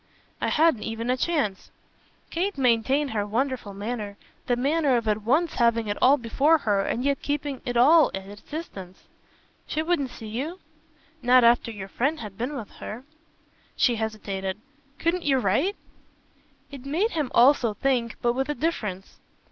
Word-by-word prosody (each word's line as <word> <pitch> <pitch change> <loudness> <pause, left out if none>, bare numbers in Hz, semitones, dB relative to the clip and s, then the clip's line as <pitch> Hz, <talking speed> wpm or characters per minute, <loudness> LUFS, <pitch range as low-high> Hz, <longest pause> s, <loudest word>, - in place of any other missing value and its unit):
"I - - +1
hadn't 315 -7 +3
even 225 +3 -3
a - - +2
chance." 260 - -1 0.6
Kate 370 +1 -1
maintained 265 +3 +2
her 210 -2 0
wonderful 230 -1 -2
manner, 205 -1 -5 0.3
the 245 - +2
manner 280 +1 +2
of 230 -2 -3
at 215 0 +1
once 300 +10 +1
having 235 -2 +2
it 205 - -2
all 275 +3 +6
before 275 +7 +3
her 205 -8 +1
and 240 - -2
yet 280 -1 0
keeping 285 -2 -3
it 245 -1 -1
all 300 +6 +6
at 195 0 -6
its 205 +1 -11
distance. 195 - -8 0.6
"She 310 - -1
wouldn't 320 -6 0
see 225 - -10
you?" 265 +11 -4 0.6
"Not 250 0 +5
after 235 0 +4
your 200 -4 -7
friend 280 +10 -1
had 210 -3 -8
been 250 +8 -3
with 225 -6 -7
her." 230 +4 -7 0.7
She 240 -3 +2
hesitated. 200 -3 -3 0.4
"Couldn't 340 +2 0
you 275 -4 +2
write?" 260 - +1 1.0
It 275 -3 -9
made 330 +11 0
him 305 -6 -1
also 240 -3 +5
think, 240 -1 0
but 240 0 +3
with 265 +3 -2
a 295 - -1
difference. 210 - -3
245 Hz, 165 wpm, -25 LUFS, 215-290 Hz, 1.0 s, all